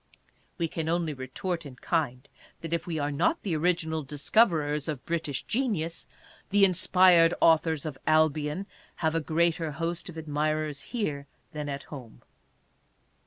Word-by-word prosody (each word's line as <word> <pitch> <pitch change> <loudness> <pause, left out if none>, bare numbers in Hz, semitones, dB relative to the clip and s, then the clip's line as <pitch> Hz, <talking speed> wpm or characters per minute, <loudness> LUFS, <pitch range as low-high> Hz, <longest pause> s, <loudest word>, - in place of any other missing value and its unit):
We 170 -2 0
can 160 0 -3
only 165 -2 0
retort 165 +7 -4
in 140 -4 -10
kind, 135 -3 -2 0.3
that 165 0 -4
if 170 - -2
we 165 -2 -2
are 145 -1 -1
not 325 - +1
the 180 -6 -1
original 160 -1 0
discoverers 150 - +1
of 150 -5 -4
British 160 -5 -2
genius, 205 -10 -2 0.4
the 200 0 +5
inspired 180 -2 +5
authors 160 -2 +3
of 140 -4 -5
Albion 155 +3 +2 0.4
have 160 - +2
a 165 - +1
greater 160 0 0
host 170 +3 -3
of 165 - -9
admirers 155 -1 -2
here 150 - -3 0.2
than 150 -1 -5
at 140 0 -4
home. 130 -6 -11
160 Hz, 145 wpm, -28 LUFS, 150-170 Hz, 0.4 s, the